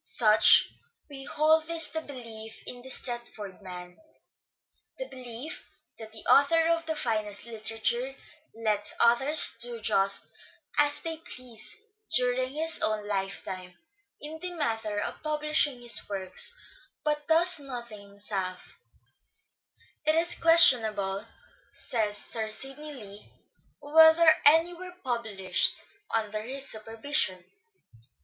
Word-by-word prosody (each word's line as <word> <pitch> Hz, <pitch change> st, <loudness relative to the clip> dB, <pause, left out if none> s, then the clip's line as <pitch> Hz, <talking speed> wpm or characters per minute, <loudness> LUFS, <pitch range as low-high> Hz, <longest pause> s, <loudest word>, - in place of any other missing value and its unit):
Such 215 Hz, -2 st, +5 dB, 0.4 s
we 270 Hz, -1 st, -10 dB
hold 315 Hz, +2 st, +1 dB
is 330 Hz, -2 st, +1 dB
the 320 Hz, -, -3 dB
belief 230 Hz, -6 st, -10 dB
in 245 Hz, -, -8 dB
the 260 Hz, -, -11 dB
Stratford 240 Hz, -6 st, -5 dB
man: 180 Hz, -2 st, -10 dB, 1.0 s
the -, -, -6 dB
belief 255 Hz, +3 st, -8 dB, 0.3 s
that 220 Hz, -1 st, -10 dB
the 220 Hz, -1 st, -10 dB
author 325 Hz, +4 st, +4 dB
of 330 Hz, -1 st, -1 dB
the 320 Hz, -, -2 dB
finest 215 Hz, -6 st, -2 dB
literature 235 Hz, +3 st, -3 dB, 0.4 s
lets 215 Hz, -2 st, 0 dB
others 265 Hz, +6 st, +4 dB
do 240 Hz, -1 st, -1 dB
just 195 Hz, -2 st, +1 dB, 0.5 s
as 295 Hz, 0 st, +3 dB
they 325 Hz, -1 st, -4 dB
please 255 Hz, -, -6 dB, 0.4 s
during 250 Hz, +1 st, 0 dB
his 320 Hz, +3 st, -2 dB
own 215 Hz, -1 st, -1 dB
lifetime 190 Hz, -2 st, -5 dB, 0.4 s
in 310 Hz, +2 st, -9 dB
the 360 Hz, +2 st, -5 dB
matter 225 Hz, -9 st, -3 dB
of -, -, -6 dB
publishing 300 Hz, -4 st, 0 dB
his 235 Hz, -, +1 dB
works 195 Hz, -, -1 dB, 0.5 s
but 300 Hz, -1 st, -2 dB
does 335 Hz, +1 st, +4 dB
nothing 240 Hz, -6 st, -8 dB
himself. 200 Hz, -2 st, -6 dB, 0.6 s
" -, -, -36 dB
It 310 Hz, -, +4 dB
is 340 Hz, +1 st, +2 dB
question 330 Hz, -7 st, +8 dB
able," 200 Hz, -1 st, -4 dB, 0.5 s
says 210 Hz, -3 st, -2 dB
Sir 220 Hz, +1 st, -4 dB
Sidney 270 Hz, +6 st, -7 dB
Lee, 210 Hz, -6 st, -12 dB, 0.3 s
" -, -, -41 dB
whether 320 Hz, 0 st, +7 dB
any 325 Hz, +4 st, +4 dB
were 360 Hz, +1 st, -11 dB
published 220 Hz, -7 st, -1 dB, 0.3 s
under 215 Hz, -1 st, -2 dB
his 270 Hz, +4 st, -4 dB
supervision." 220 Hz, -4 st, -1 dB
240 Hz, 125 wpm, -27 LUFS, 215-305 Hz, 1.0 s, question